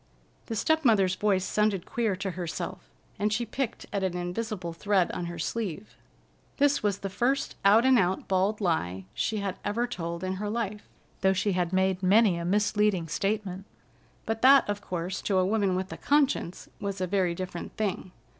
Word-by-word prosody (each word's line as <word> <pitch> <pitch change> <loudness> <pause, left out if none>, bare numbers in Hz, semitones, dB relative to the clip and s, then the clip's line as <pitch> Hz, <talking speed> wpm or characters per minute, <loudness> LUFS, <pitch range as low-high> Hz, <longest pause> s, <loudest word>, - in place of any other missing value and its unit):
The 225 - -3
step 315 +8 +1
mother's 200 -7 +4
voice 190 -1 +1
sounded 210 -3 +1
queer 225 -5 -1
to 190 +1 -3
herself, 170 - -5 0.3
and 210 +1 +1
she 235 +3 0
picked 240 +1 -4
at 200 - 0
an 180 -1 -1
invisible 180 0 -4
thread 190 +1 +1
on 175 - -4
her 170 0 -6
sleeve. 200 +2 -4 0.6
This 285 0 +3
was 205 -2 0
the 200 - -4
first 255 +7 0
out 210 +5 +6
and 260 -2 +6
out 185 -1 0
bald 195 +3 +1
lie 95 - -1
she 215 - -1
had 195 -2 -3
ever 215 +4 0
told 170 -7 -5
in 185 0 -2
her 210 - -2
life, 210 -2 -3 0.3
though 190 0 +3
she 190 +2 0
had 180 -2 0
made 190 0 +1
many 200 +1 +5
a 170 - -4
misleading 205 -2 +1
statement; 195 +1 -2 0.6
but 225 0 -2
that, 270 +2 +7
of 205 0 -2
course, 180 0 -4
to 195 - 0
a 185 - +3
woman 200 -2 +1
with 185 +1 -3
a - - -7
conscience, 280 - +1
was 200 -1 -4
a 185 - 0
very 180 -2 0
different 180 -1 -6
thing. 195 -3 -2
195 Hz, 185 wpm, -28 LUFS, 185-215 Hz, 0.6 s, that